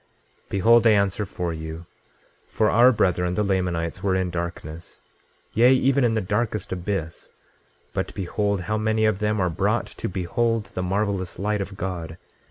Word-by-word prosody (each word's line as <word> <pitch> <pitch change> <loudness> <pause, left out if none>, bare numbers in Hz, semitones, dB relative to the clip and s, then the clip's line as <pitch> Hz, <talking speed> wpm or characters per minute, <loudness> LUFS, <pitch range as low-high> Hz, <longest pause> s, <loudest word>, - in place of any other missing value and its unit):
26:3 - - -36
Behold, 115 +4 +5
I - - +7
answer 100 0 +1
for 90 -2 -3
you; 80 +1 -7 0.6
for 110 -1 +1
our 120 +3 +6
brethren, 90 -5 +1
the 105 - +1
Lamanites, 90 -3 -1
were 95 -1 +1
in 95 -1 0
darkness, 85 -2 -6 0.5
yea, 120 +3 +5
even 135 +1 +2
in 115 -2 +2
the 110 - +1
darkest 105 +1 -2
abyss, 90 -2 -4 0.6
but - - -2
behold, 100 +1 -1
how 105 +5 -2
many 110 0 +1
of 110 -3 +1
them 105 0 0
are 90 -2 +1
brought - - 0
to - - -6
behold 110 +5 -1
the - - -2
marvelous 95 -1 -1
light 105 +2 -1
of 100 0 -6
God! 85 -3 -5
95 Hz, 170 wpm, -24 LUFS, 90-110 Hz, 0.6 s, I